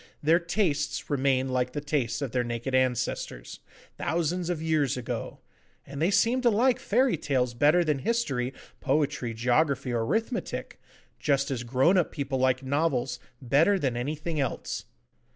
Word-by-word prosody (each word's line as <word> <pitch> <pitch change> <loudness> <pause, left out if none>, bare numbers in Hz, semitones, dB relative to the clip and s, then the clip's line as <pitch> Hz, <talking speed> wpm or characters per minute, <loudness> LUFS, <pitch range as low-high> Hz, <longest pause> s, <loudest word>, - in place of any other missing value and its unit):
Their 165 +3 +5
tastes 170 -6 -1
remain 135 -1 +1
like 125 0 -1
the 145 - -2
tastes 145 -4 -1
of 135 - -3
their 125 0 +1
naked 120 +2 -4
ancestors, 130 -2 -1 0.4
thousands 170 +2 -1
of 175 -3 -1
years 155 -5 +1
ago, 125 - -5 0.4
and 140 +1 -7
they 170 - +3
seem 230 +6 +3
to 245 - +4
like 240 +3 +3
fairy 245 -3 +2
tales 130 -4 0
better 150 +8 +4
than 150 -4 0
history, 135 - -1 0.3
poetry, 135 -4 0
geography, 125 +2 +1
or 115 -1 0
arithmetic, 225 - -3 0.4
just 140 -1 +1
as 125 -3 -2
grown 130 +10 +3
up 175 - 0
people 140 -3 -3
like 130 0 +2
novels 135 -3 0 0.2
better 150 +11 +4
than 135 -9 -1
anything 150 +5 -3
else. 135 -4 -3
140 Hz, 150 wpm, -27 LUFS, 130-165 Hz, 0.4 s, Their